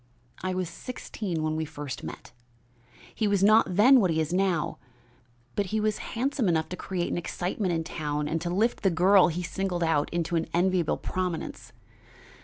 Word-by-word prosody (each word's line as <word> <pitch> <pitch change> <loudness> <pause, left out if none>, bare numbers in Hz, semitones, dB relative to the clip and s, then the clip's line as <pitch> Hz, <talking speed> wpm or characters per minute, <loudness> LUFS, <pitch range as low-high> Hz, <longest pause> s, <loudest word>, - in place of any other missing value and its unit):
"I 185 0 -2
was 185 -1 -1
sixteen 180 -3 -5
when 155 0 0
we 160 - -1
first 145 -3 -6
met. - - -8 0.8
He 220 - 0
was 200 -1 +2
not 215 -3 +5
then 250 +7 +7
what 190 -5 +2
he 160 -1 +1
is 160 +2 -1
now, 185 -4 0 0.8
but 200 - 0
he 215 +4 -1
was 215 0 0 0.2
handsome 255 -3 +1
enough 160 -2 +1
to 180 - -4
create 180 -2 -3
an - - -1
excitement 180 +3 -2
in 165 -1 0
town 150 -2 -3
and 160 +1 -1
to 175 - -2
lift 215 +7 +1
the 195 - +3
girl 185 +3 +5
he 175 +1 -3
singled 175 +1 -2
out 155 -3 +1
into 170 0 -1
an 165 - -1
enviable 180 -2 +2
prominence. 180 -3 -4
180 Hz, 185 wpm, -27 LUFS, 165-195 Hz, 0.8 s, then